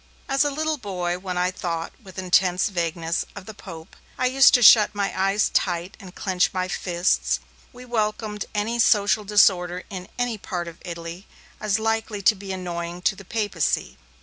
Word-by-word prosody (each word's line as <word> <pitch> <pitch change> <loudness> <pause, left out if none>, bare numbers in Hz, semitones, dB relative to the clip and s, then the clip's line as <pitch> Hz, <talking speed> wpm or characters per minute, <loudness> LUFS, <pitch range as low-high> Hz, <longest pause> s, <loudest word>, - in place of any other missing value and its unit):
As 270 +1 +2
a 290 - +1
little 310 +1 -2
boy, 180 -4 -3
when 180 -1 -5
I 180 +1 +1
thought, 165 -3 -4
with 190 -2 -13
intense 185 +1 +2
vagueness, 170 -2 -2
of - - -9
the 220 - -9
Pope, 170 -5 -11 0.2
I - - 0
used 270 +2 +6
to 245 - +3
shut 210 -1 +7
my 200 -1 -1
eyes 195 +2 +2
tight 175 0 0
and 190 -3 -12
clench 185 -2 +1
my 185 -1 -2
fists. 180 -1 0 0.3
We 250 0 -12
welcomed 215 -3 -2
any 225 +3 -1
social 210 -1 +3
disorder 185 -3 +3
in 185 -1 -6
any 245 -3 -1
part 175 -3 -4
of 170 - -10
Italy, 170 +1 -7 0.3
as 210 -1 0
likely 225 -2 -2
to 215 - +6
be 195 -1 -8
annoying 175 -1 -5
to 195 - +2
the 200 - -12
Papacy. 210 0 -1
195 Hz, 175 wpm, -24 LUFS, 180-215 Hz, 0.3 s, shut